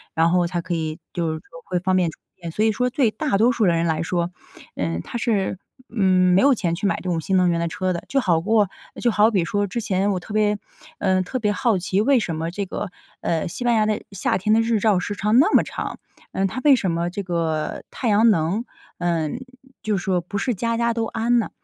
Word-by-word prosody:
然 165 Hz, +1 st, +3 dB
后 175 Hz, -1 st, +3 dB
才 175 Hz, -1 st, -2 dB
可 175 Hz, 0 st, -4 dB
以 160 Hz, -1 st, -2 dB, 0.2 s
就 170 Hz, -2 st, -1 dB
是 160 Hz, -, -5 dB
说 165 Hz, +1 st, -14 dB
会 180 Hz, -, -1 dB
方 185 Hz, +1 st, +1 dB
便 180 Hz, -3 st, +2 dB
充 -, -, -12 dB
电。 -, -, -63 dB, 0.3 s
所 210 Hz, -, 0 dB
以 220 Hz, -, +4 dB
说 250 Hz, +3 st, 0 dB
对 250 Hz, -3 st, +2 dB
大 275 Hz, -4 st, -1 dB
多 235 Hz, +3 st, +5 dB
数 230 Hz, -3 st, +1 dB
人 170 Hz, -2 st, +2 dB
来 160 Hz, 0 st, 0 dB
说， 170 Hz, 0 st, -1 dB, 0.5 s
嗯， 85 Hz, -1 st, -2 dB
他 240 Hz, -, -6 dB
是， 205 Hz, -6 st, 0 dB, 0.3 s
嗯， 185 Hz, -4 st, +3 dB
没 -, -, +5 dB
有 280 Hz, 0 st, +6 dB
钱 175 Hz, -8 st, -1 dB
去 200 Hz, +4 st, -4 dB
买 -, -, +1 dB
这 -, -, -9 dB
种 165 Hz, -2 st, 0 dB
新 190 Hz, +4 st, -1 dB
能 180 Hz, -1 st, +4 dB
源 170 Hz, 0 st, +1 dB
的 170 Hz, -, 0 dB
车 185 Hz, +3 st, -2 dB
的。 170 Hz, -1 st, -3 dB
就 275 Hz, -, +1 dB
好 175 Hz, -9 st, +2 dB
过 210 Hz, +2 st, +2 dB, 0.3 s
就 240 Hz, -, +3 dB
好 215 Hz, +1 st, +4 dB
比 190 Hz, -5 st, +2 dB
说 205 Hz, +4 st, 0 dB
之 230 Hz, +4 st, -3 dB
前 200 Hz, -1 st, 0 dB
我 185 Hz, -, -1 dB
特 175 Hz, -, -12 dB
别， 210 Hz, -1 st, +1 dB, 0.4 s
嗯， 185 Hz, -2 st, +2 dB
特 255 Hz, +8 st, -4 dB
别 210 Hz, -3 st, +1 dB
好 215 Hz, -2 st, +1 dB
奇， 185 Hz, +2 st, 0 dB
为 265 Hz, +2 st, +4 dB
什 170 Hz, -6 st, -3 dB
么 165 Hz, +1 st, -3 dB
这 200 Hz, +3 st, -3 dB
个， 190 Hz, 0 st, -5 dB, 0.3 s
呃， 165 Hz, -1 st, -1 dB
西 205 Hz, -, -6 dB
班 240 Hz, -1 st, +3 dB
牙 215 Hz, -1 st, +3 dB
的 215 Hz, 0 st, 0 dB
夏 195 Hz, -, 0 dB
天 215 Hz, +3 st, +1 dB
的 225 Hz, -, +5 dB
日 225 Hz, -1 st, +1 dB
照 205 Hz, -3 st, +3 dB
时 205 Hz, +3 st, -4 dB
长 210 Hz, +4 st, +3 dB
那 380 Hz, +10 st, +4 dB
么 -, -, +6 dB
长？ -, -, -5 dB, 0.4 s
嗯， 195 Hz, -, 0 dB
它 255 Hz, +7 st, -3 dB
为 285 Hz, -2 st, +8 dB
什 190 Hz, -8 st, -1 dB
么 170 Hz, +1 st, -1 dB
这 200 Hz, +3 st, -5 dB
个 165 Hz, -3 st, -2 dB
太 240 Hz, -, -2 dB
阳 215 Hz, +3 st, +5 dB
能， 190 Hz, +3 st, +1 dB, 0.4 s
嗯， 165 Hz, -3 st, -1 dB, 0.4 s
就 210 Hz, -2 st, 0 dB
说 180 Hz, -1 st, 0 dB
不 200 Hz, +4 st, -5 dB
是 245 Hz, +5 st, 0 dB
家 230 Hz, +3 st, -1 dB
家 235 Hz, 0 st, +1 dB
都 230 Hz, -1 st, -1 dB
安 235 Hz, +2 st, +1 dB
呢？ 225 Hz, -, -2 dB
195 Hz, 270 characters per minute, -22 LUFS, 170-225 Hz, 0.5 s, 为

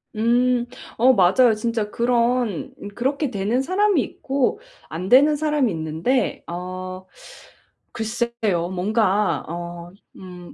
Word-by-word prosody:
음. 240 Hz, +2 st, +2 dB, 0.3 s
어 255 Hz, +3 st, +5 dB
맞아요. 220 Hz, +4 st, +4 dB
진짜 220 Hz, -1 st, -2 dB
그런 245 Hz, +2 st, 0 dB, 0.2 s
그렇게 275 Hz, +3 st, -1 dB
되는 210 Hz, +5 st, -1 dB
사람이 375 Hz, +1 st, +2 dB
있고 275 Hz, -, -2 dB, 0.3 s
안 175 Hz, +4 st, -5 dB
되는 285 Hz, +6 st, +6 dB
사람이 295 Hz, -6 st, 0 dB
있는데 165 Hz, -, -1 dB
어 185 Hz, +1 st, -6 dB, 0.9 s
글쎄요. 220 Hz, -6 st, -2 dB
뭔가 205 Hz, 0 st, +1 dB
어 175 Hz, 0 st, -7 dB, 0.3 s
음 180 Hz, -2 st, -11 dB
230 Hz, 205 characters per minute, -22 LUFS, 185-255 Hz, 0.9 s, 되는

